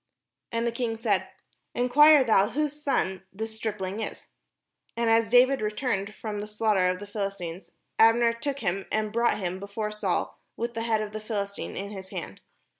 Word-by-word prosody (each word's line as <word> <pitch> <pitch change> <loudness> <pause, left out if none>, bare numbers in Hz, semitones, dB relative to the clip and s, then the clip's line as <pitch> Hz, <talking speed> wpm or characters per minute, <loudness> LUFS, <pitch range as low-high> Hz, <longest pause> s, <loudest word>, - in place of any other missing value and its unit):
And 230 0 -1
the 235 - +1
king 235 -1 -2
said: 215 -4 0 0.5
"Enquire 285 +4 +6
thou 210 -4 +4
whose 300 +1 -2
son 190 -10 0
the 215 +4 -4
stripling 215 -3 -4
is." - - -6 0.7
And 235 -1 +2
as 225 0 +3
David 250 +1 +5
returned 210 -2 -2
from 210 -2 -5
the 210 - -5
slaugh 215 +1 +1
ter 185 -2 +3
of 180 0 -2
the 205 - -7
Philistine, 195 -4 -4 0.4
Abner 230 +1 +5
took 275 +4 -4
him, 195 -1 -1
and 215 -1 -1
brought 235 +1 +2
him 185 -2 -3
before 205 +2 -4
Saul, 210 - -2 0.2
with 235 +1 -3
the 225 - -3
head 225 -2 +1
of 210 - -6
the 215 - -4
Philistine 200 -2 -4
in 200 +1 -5
his 190 -2 -8
hand. 95 - -7
215 Hz, 185 wpm, -27 LUFS, 200-235 Hz, 0.7 s, Enquire